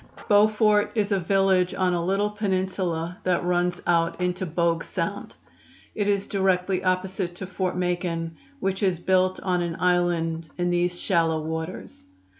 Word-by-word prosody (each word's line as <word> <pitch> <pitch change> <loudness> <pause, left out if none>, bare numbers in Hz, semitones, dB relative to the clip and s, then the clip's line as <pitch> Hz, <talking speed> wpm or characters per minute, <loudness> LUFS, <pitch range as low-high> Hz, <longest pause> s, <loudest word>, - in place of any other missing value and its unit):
Beaufort 210 0 +4
is 210 -2 0
a 200 - +2
village 190 0 +2
on 185 -1 +1
a 170 -1 0
little 200 +3 +1
peninsula 185 -4 -2
that 180 -1 0
runs 175 0 0
out 165 0 +1
into 180 +1 -1
Bogue 165 0 0
Sound. - - -4 0.6
It 205 -1 -1
is 200 -1 +1
directly 190 -1 0
opposite 185 -1 -1
to 190 - -6
Fort 185 -1 -2
Macon, 175 -2 -2 0.2
which 190 -4 -1
is 185 -3 +2
built 185 +1 +2
on 180 -2 0
an 170 -1 -2
island 170 -2 +1
in 175 0 0
these 175 0 0
shallow 165 -4 +1
waters. 160 +2 -6
180 Hz, 150 wpm, -25 LUFS, 175-190 Hz, 0.6 s, Beaufort